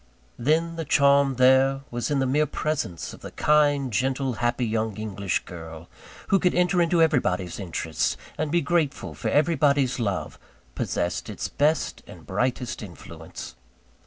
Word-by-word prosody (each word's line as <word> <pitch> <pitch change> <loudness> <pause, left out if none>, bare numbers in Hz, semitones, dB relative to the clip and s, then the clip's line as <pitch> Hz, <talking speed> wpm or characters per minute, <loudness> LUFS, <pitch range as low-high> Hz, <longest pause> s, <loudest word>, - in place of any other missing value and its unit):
Then, 165 +6 +1
the 165 - -2
charm 140 -2 +4
there 130 +2 +4
was 120 -1 -2
in 145 - +1
the 135 - +1
mere 150 +4 +2
presence 135 - -3
of - - -12
the - - -7
kind, 145 -4 +2
gentle, 130 +3 0
happy 120 +1 +1
young 110 -2 -1
English 100 -3 -2
girl, 80 -2 -9 0.4
who 195 - +4
could 180 - +2
enter 180 0 +3
into 170 0 +3
everybody's 95 - 0
interests, 85 -4 -2 0.2
and 155 0 -2
be 170 +1 +3
grateful 165 -5 -1
for - - -3
everybody's 145 -4 +2
love, 100 -5 -2 0.3
possessed 85 +7 -2
its - - -4
best 150 +2 0
and - - -12
brightest 125 0 -2
influence. 85 - -10
135 Hz, 150 wpm, -25 LUFS, 110-150 Hz, 0.4 s, charm